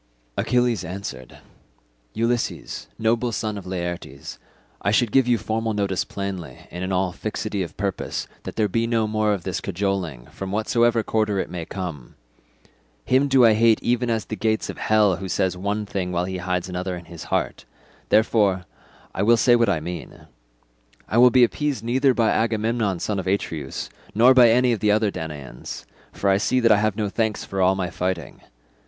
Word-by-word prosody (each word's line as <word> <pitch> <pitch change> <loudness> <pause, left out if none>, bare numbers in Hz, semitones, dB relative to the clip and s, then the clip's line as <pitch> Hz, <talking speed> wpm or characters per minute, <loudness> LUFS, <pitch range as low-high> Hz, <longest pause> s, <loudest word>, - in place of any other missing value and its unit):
Achilles 120 -5 +1
answered, 85 -9 -7 0.8
"Ulysses, 115 +1 -2
noble 115 +2 +1
son 110 -1 -2
of 95 -2 -8
Laertes, 85 -6 -5 0.4
I 100 - +1
should 110 +1 +2
give 130 0 +4
you 120 -1 +3
formal 110 +1 -2
notice 100 -2 0
plainly 95 -9 -6
and 90 +2 -5
in 95 - -2
all 95 -1 +1
fixity 105 0 -3
of 85 - -6
purpose 100 -1 -3
that - - -7
there 110 -2 +2
be 115 +4 0
no 115 -2 +1
more 110 0 +1
of 100 -4 -2
this 95 -1 -3
cajoling, 90 -9 -2
from 95 -1 -6
whatsoever 115 +2 +2
quarter 110 -2 0
it 95 - -2
may 85 -2 -5
come. 85 -10 -6 0.9
Him 130 +3 +3
do 130 -3 +5
I 115 - +6
hate 110 +1 +4
even 120 0 +1
as 110 -2 0
the 110 - -5
gates 110 0 0
of - - -12
hell 105 -4 +3
who 95 0 -6
says 90 +1 0
one 100 +3 -2
thing 95 -3 -3
while 90 0 0
he 95 0 -4
hides 90 0 -2
another 90 0 -3
in 85 - -11
his 85 -1 -10
heart; - - -2 0.4
therefore 105 -4 +3 0.5
I - - -2
will 115 +3 +5
say 120 +1 +5
what 115 -3 +3
I 90 -5 +1
mean. 85 0 -7 0.8
I 115 - +1
will 125 +1 +8
be 125 0 +5
appeased 140 -1 0
neither 130 +2 +2
by 115 -2 +3
Agamemnon 110 -3 0
son 100 +2 -2
of 95 - -5
Atreus 80 -8 -2 0.3
nor 120 +4 +7
by 125 -2 +7
any 125 +2 +4
other 105 -1 +1
of - - +3
the 110 -2 0
Danaans, 75 -8 -7 0.3
for 100 - -3
I 95 0 +5
see 130 +5 +1
that 115 -2 +4
I 105 - +6
have 105 -1 +1
no 105 -2 0
thanks 110 +1 -1
for 95 -1 -3
all 95 +1 +4
my 90 -2 -3
fighting. 90 0 -3
105 Hz, 190 wpm, -23 LUFS, 90-115 Hz, 0.9 s, will